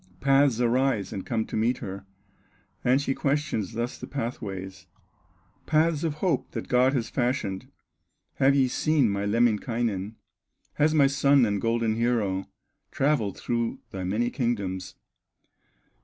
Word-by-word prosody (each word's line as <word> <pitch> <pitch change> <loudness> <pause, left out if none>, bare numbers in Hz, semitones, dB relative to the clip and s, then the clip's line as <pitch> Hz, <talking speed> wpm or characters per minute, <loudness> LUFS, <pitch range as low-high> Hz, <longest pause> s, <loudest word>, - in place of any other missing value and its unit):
Paths 135 -3 +3
arise 120 -4 +1
and 95 - -4
come 115 -3 -1
to - - -7
meet 115 +3 +1
her, 95 +1 -7 0.8
And 125 +2 +4
she 140 -1 -1
questions 140 -7 -1
thus 120 +2 -3
the - - -7
pathways: 95 -8 -5 0.8
"Paths 160 0 +2
of 160 -3 -1
hope 155 -3 -1
that - - -5
God 130 +2 +3
has 120 -4 -2
fashioned, 120 -7 -1 0.7
Have 135 +1 +4
ye 135 -2 +4
seen 140 -3 +2
my 100 0 -2
Lemminkainen, 115 -2 0 0.6
Has 155 +1 +2
my 145 -2 +6
son 140 -1 +4
and 100 -2 -1
golden 115 -1 +1
hero 110 -5 0 0.4
Travelled 135 -9 0
through 115 +2 -2
thy 95 -1 -5
many 110 +6 0
kingdoms?" 100 -7 -2
120 Hz, 135 wpm, -26 LUFS, 105-135 Hz, 0.8 s, my